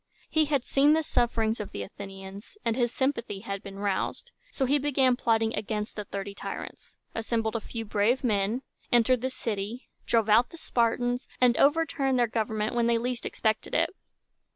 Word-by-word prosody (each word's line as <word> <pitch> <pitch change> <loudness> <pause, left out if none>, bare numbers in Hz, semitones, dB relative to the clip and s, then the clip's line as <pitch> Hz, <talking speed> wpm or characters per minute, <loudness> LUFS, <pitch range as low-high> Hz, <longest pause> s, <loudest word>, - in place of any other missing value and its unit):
He 315 -1 +4
had 280 -4 0
seen 285 +2 +4
the 320 0 +2
sufferings 230 -4 +1
of 210 - -4
the 100 - -4
Athenians, 195 - -10
and 230 - +1
his 240 -2 +1
sympathy 240 -8 -1
had 200 -2 -4
been 195 0 -9
roused. 200 -1 -2 0.2
So 270 - -1
he 285 +3 +3
began 265 -3 +3
plotting 225 -2 +1
against 210 0 -3
the 210 - -4
Thirty 200 0 -5
Tyrants, - - -8 0.2
assembled 225 0 -1
a 230 - -1
few 225 +1 -6
brave 215 +5 +1
men, 215 +2 +1 0.3
entered 240 +1 +4
the 260 - 0
city, 225 -1 -4 0.2
drove 225 -2 +3
out 225 +3 +5
the 335 - -11
Spartans, 245 -3 0
and 245 -1 +5
overturned 280 -3 +3
their 240 - +4
government 220 -1 -1
when 235 -1 +2
they 235 0 +3
least 245 +1 -2
expected 220 -1 -1
it. - - +3
230 Hz, 175 wpm, -28 LUFS, 210-255 Hz, 0.3 s, out